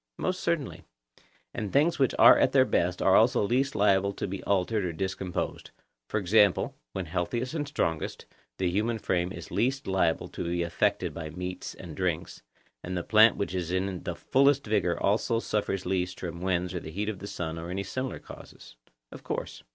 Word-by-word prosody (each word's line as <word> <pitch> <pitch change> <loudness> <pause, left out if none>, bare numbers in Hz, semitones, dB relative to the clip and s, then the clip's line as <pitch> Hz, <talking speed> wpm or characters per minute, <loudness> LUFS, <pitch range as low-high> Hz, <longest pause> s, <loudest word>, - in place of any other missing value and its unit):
Most 185 0 -1
certainly. 165 -7 -2 0.7
And 105 -3 -4
things 150 +4 +3
which 135 -3 +2
are - - +9
at - - +3
their - - +6
best 90 +1 0
are 95 - +5
also 120 +1 +4
least 130 +5 +1
liable 100 -1 +3
to - - -4
be 100 0 -5
altered 100 +2 +1
or 90 -2 -2
discomposed; 95 +1 -3 0.4
for 105 - 0
example, 100 0 +3 0.2
when 95 - -3
healthiest 95 - -2
and 150 -3 -2
strongest, 80 - -2 0.3
the 95 - 0
human 110 +5 0
frame 90 -4 -1
is - - -9
least 135 +3 0
liable 95 -4 +1
to - - -5
be 85 0 -1
affected 85 -2 0
by 80 -2 -6
meats 90 +3 -6
and - - -9
drinks, - - -2 0.4
and 90 +1 -4
the 90 - -2
plant 110 +3 +6
which 100 - -2
is 90 -2 -2
in 95 -1 -1
the - - -4
fullest 140 +1 +3
vigour 100 -5 +1
also 115 +3 +1
suffers 100 -4 -2
least 90 -1 -1
from 85 -1 -6
winds 90 0 0
or 90 - -2
the 80 - -9
heat 100 +6 -3
of 105 -3 -3
the 100 - -7
sun 80 -4 -4
or 85 +1 -6
any 95 +2 -2
similar 130 +4 -4
causes. - - -13 0.3
Of - - -10
course. - - -4
95 Hz, 190 wpm, -28 LUFS, 90-110 Hz, 0.7 s, are